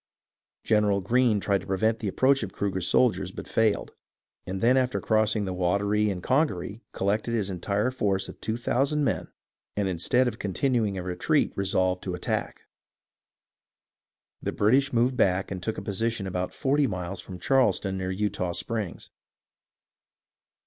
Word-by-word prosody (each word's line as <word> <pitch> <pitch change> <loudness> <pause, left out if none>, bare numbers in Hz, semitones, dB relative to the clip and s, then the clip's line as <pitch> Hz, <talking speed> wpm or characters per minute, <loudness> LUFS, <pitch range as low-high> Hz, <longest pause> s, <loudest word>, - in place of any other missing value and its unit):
General 105 -2 +3
Greene 115 +2 +2
tried 100 0 +1
to 95 - -12
prevent 110 +4 +1
the 105 - -3
approach 135 +7 +3
of 105 -4 -4
Cru 100 0 -2
ger's 90 -2 -1
soldiers, 95 -7 +2
but - - -8
failed, 110 -2 +1 0.6
and 95 +1 -3
then 120 +5 +4
after 130 -1 +1
crossing 110 -1 +1
the 95 - -3
Wateree 100 +4 +1
and 90 -3 -4
Congaree 115 - 0
collected 105 +4 -1
his 100 -3 -1
entire 100 +6 -1
force 100 -6 0
of - - -11
two 110 +2 -2
thousand 140 +5 +1
men, 140 - -1 0.5
and 100 -1 +1
instead 95 +8 +2
of 115 -2 -4
continuing 105 0 0
a 90 - -4
retreat 90 0 +1
resolved 95 -1 0
to 90 -2 -3
attack. 90 - -3 1.8
The - - -2
British 130 +7 +3
moved 125 +2 +2
back 95 +1 +2
and 95 -2 -4
took 110 +4 -3
a - - -5
position 110 +1 -2
about 90 -1 -2
forty 140 +1 +1
miles 90 -2 -4
from 95 - -9
Charleston 100 -5 +1
near 95 0 -2
Eutaw 95 -2 -1
Springs. 110 -7 -4
100 Hz, 155 wpm, -27 LUFS, 95-115 Hz, 1.8 s, then